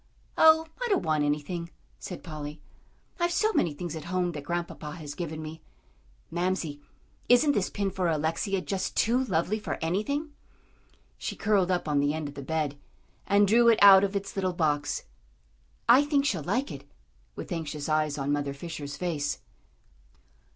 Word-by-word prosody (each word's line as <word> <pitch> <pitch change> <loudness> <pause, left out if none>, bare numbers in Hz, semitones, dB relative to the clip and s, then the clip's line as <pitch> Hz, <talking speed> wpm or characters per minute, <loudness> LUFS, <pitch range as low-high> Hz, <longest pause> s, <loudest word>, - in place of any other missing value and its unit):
"Oh, 320 0 +6 0.2
I - - 0
don't 395 - +2
want 155 -2 +1
anything," 150 +4 -2 0.3
said 180 - -7
Polly. 150 -2 -7 0.6
"I've 345 0 +1
so 435 +5 +2
many 170 - +2
things 165 +2 -5
at 160 - -7
home 180 0 0
that 150 -4 -7
Grandpapa 170 -3 -4
has 150 -4 -7
given 160 -1 -5
me. 155 +1 -8 0.7
Mamsie, 170 -4 -2 0.5
isn't 245 +5 +6
this 205 -9 0
pin 200 -1 -2
for 185 -2 -1
Alexia 165 +5 0
just 190 0 -3
too 245 +4 +3
lovely 210 -1 0
for 215 - -4
anything?" 280 - -1 0.9
She - - -4
curled 200 -3 +2
up 180 -3 0
on 145 -1 +2
the 145 +2 +1
end 155 -2 -3
of 145 - -8
the 140 - -7
bed, 145 0 -2 0.5
and 200 0 +4
drew 235 +3 +5
it 225 - +5
out 195 -1 +10
of 200 0 -1
its 195 0 -3
little 185 -2 0
box. 145 -4 0 0.8
"I 250 +4 +7
think 290 -1 +1
she'll 195 - 0
like 250 - -1
it," 140 -1 -9 0.5
with - - -8
anxious 155 -4 -4
eyes 155 -1 +1
on 140 0 -1
Mother 145 -1 -1
Fisher's 145 -2 -6
face. 155 -5 -2
170 Hz, 170 wpm, -28 LUFS, 150-200 Hz, 0.9 s, out